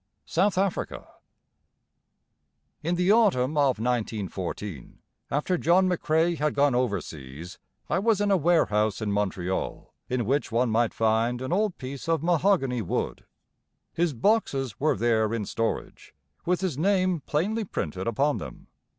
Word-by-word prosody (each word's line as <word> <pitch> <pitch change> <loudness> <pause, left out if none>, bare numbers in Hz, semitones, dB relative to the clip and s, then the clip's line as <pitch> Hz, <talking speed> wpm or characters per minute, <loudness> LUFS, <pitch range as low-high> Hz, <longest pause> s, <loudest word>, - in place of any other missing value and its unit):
South 190 +3 +1
Africa 195 -1 -1 1.7
In 170 +3 0
the 180 +2 +2
Autumn 170 - +3
of 140 -5 +3
1914, 105 - -3 0.3
after 160 +5 0
John 185 +3 +4
McCrae 170 -1 +1
had 150 0 0
gone 140 -1 +3
over 120 -6 +1
seas, 75 +4 -10 0.3
I 170 - +1
was 215 0 +2
in 205 0 +1
a - - +5
warehouse 110 - +2
in 110 -2 -2
Montreal, 95 -2 -2 0.2
in 125 -2 0
which 140 +1 0
one 120 +1 +1
might 115 +1 +1
find 115 +2 +1
an 130 +6 -3
old 205 -1 0
piece 135 +4 -7
of 165 -2 +1
mahogany 165 - +2
wood. - - -3 0.7
His 170 -2 0
boxes 135 - 0
were 155 -4 +2
there 110 0 +2
in 105 -3 -3
storage, 115 +3 -4 0.3
with 180 +1 +1
his 175 -8 -2
name 185 -1 +2
plainly 200 +12 -1
printed 95 - -4
upon 140 +6 +1
them. - - -10
140 Hz, 140 wpm, -26 LUFS, 110-175 Hz, 1.7 s, a